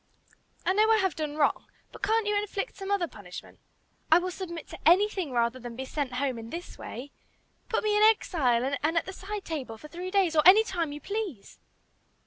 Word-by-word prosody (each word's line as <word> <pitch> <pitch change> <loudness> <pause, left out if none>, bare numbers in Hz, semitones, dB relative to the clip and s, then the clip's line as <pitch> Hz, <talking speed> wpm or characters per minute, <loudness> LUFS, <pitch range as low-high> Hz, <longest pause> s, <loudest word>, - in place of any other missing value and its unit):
I 370 - +3
know 430 +2 +4
I 445 - +6
have 380 -6 +1
done 305 -2 -3
wrong, 300 -2 +1 0.2
but - - -12
can't 440 +2 +2
you 415 0 +1
inflict 410 +2 -2
some 390 0 -7
other 400 -4 +1
punishment? 200 - -11 0.5
I 320 - +9
will 365 +1 -1
submit 340 -3 -6
to - - -9
anything 375 -1 +4
rather 235 +1 0
than 240 -1 -8
be 265 +2 -5
sent 275 -2 -3
home 255 -2 -1
in 225 0 -8
this 345 +5 -7
way. 270 +4 -8 0.6
Put 450 - 0
me 425 -1 +2
in 420 - +3
'exile' 280 - +3
and 320 +3 +1
at - - +2
the 380 - -7
'side 405 +2 -6
table,' 265 -9 -5
for 300 - -12
three 355 +3 -6
days, 370 -4 +2
or 305 - +6
any 385 +6 +8
time 345 -8 -2
you 295 +1 -7
please!" 400 - -5
340 Hz, 210 wpm, -28 LUFS, 280-400 Hz, 0.6 s, I